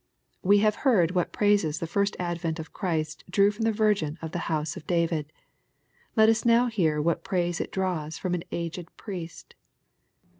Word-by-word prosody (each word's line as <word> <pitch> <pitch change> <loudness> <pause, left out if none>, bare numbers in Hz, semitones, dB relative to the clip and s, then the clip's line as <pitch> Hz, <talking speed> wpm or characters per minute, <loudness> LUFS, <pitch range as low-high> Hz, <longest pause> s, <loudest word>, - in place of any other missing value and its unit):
We 200 +2 +5
have 215 0 +2
heard 195 - +4
what 180 -2 0
praises 205 -7 +2
the - - -3
first 200 +5 0
advent 170 -2 -2
of 160 -1 -8
Christ 160 -5 -2
drew 200 +3 +4
from 225 +2 -3
the 225 - +3
Virgin 205 -8 +1
of 160 -1 -6
the 175 - -3
house 155 -1 -1
of 155 - -10
David. 165 -3 0 0.8
Let 220 -2 +6
us 225 0 +3
now 235 +1 +5
hear 175 -11 +1
what 165 +2 0
praise 175 -2 -1
it - - -5
draws 175 -5 -2
from 180 -2 -2
an 175 -2 -2
aged 170 0 -4
priest. 175 -6 -8
175 Hz, 180 wpm, -27 LUFS, 160-205 Hz, 0.8 s, Let